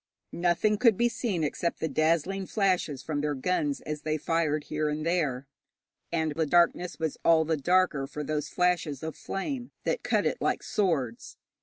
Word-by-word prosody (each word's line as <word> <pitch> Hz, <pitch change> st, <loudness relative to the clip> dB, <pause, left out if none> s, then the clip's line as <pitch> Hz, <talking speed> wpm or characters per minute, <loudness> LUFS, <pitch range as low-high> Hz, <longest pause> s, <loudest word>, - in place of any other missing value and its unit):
Nothing 180 Hz, +5 st, +1 dB
could 230 Hz, -5 st, +5 dB
be 240 Hz, -, +3 dB
seen 205 Hz, -9 st, -2 dB
except 170 Hz, +3 st, -1 dB
the 160 Hz, -, -1 dB
dazzling 165 Hz, +6 st, +1 dB
flashes 180 Hz, -, 0 dB
from 145 Hz, -1 st, -2 dB
their 150 Hz, -1 st, -1 dB
guns 185 Hz, -, -1 dB
as 150 Hz, -1 st, -5 dB
they 155 Hz, 0 st, -1 dB
fired 155 Hz, -1 st, 0 dB
here 155 Hz, 0 st, -1 dB
and 150 Hz, +1 st, -3 dB
there, 150 Hz, -7 st, 0 dB, 0.7 s
and 160 Hz, -2 st, 0 dB
the 160 Hz, +1 st, -1 dB
darkness 175 Hz, +2 st, +2 dB
was 160 Hz, -2 st, -3 dB
all 160 Hz, -1 st, +5 dB
the 160 Hz, +1 st, +1 dB
darker 155 Hz, -2 st, +2 dB
for 150 Hz, +1 st, -5 dB
those 150 Hz, 0 st, -2 dB
flashes 175 Hz, -6 st, 0 dB
of 160 Hz, 0 st, -4 dB
flame, 245 Hz, +5 st, -4 dB
that -, -, -1 dB
cut -, -, +1 dB
it -, -, -1 dB
like -, -, 0 dB
swords. 145 Hz, -, -1 dB
160 Hz, 175 wpm, -28 LUFS, 150-180 Hz, 0.7 s, could